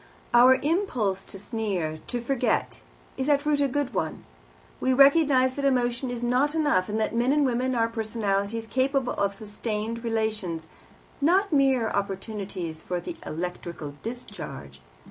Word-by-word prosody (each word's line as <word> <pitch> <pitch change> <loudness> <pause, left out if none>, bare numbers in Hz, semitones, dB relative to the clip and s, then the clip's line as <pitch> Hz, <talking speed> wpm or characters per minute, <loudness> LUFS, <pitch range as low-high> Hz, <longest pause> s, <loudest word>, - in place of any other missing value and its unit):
Our 250 +2 +8
impulse 255 - 0
to - - -7
sneer, 195 -7 -3
to 245 -1 -2
forget, 255 +1 0 0.4
is 265 +2 -1
at 285 0 +3
root 295 -1 +2
a 280 - +3
good 280 0 -2
one. 160 - -3 0.5
We 260 - +2
recognize 275 -1 +5
that 280 - -4
emotion 250 -1 +1
is 245 -1 -4
not 260 +5 +2
enough, 290 -12 +2
and 215 +1 -1
that 220 - 0
men 240 +3 +2
and 290 0 +3
women 255 0 0
are 230 -1 +2
personalities 220 -1 -1
capable 260 +2 0
of 200 0 0
sustained 215 +2 -4
relations, 215 -8 -2 0.5
not 365 +5 +3
mere 265 -5 +3
opportunities 195 -4 -4
for 180 - -3
an 330 - -5
electrical 170 -2 -5
discharge. 205 - -7
235 Hz, 145 wpm, -26 LUFS, 200-265 Hz, 0.5 s, Our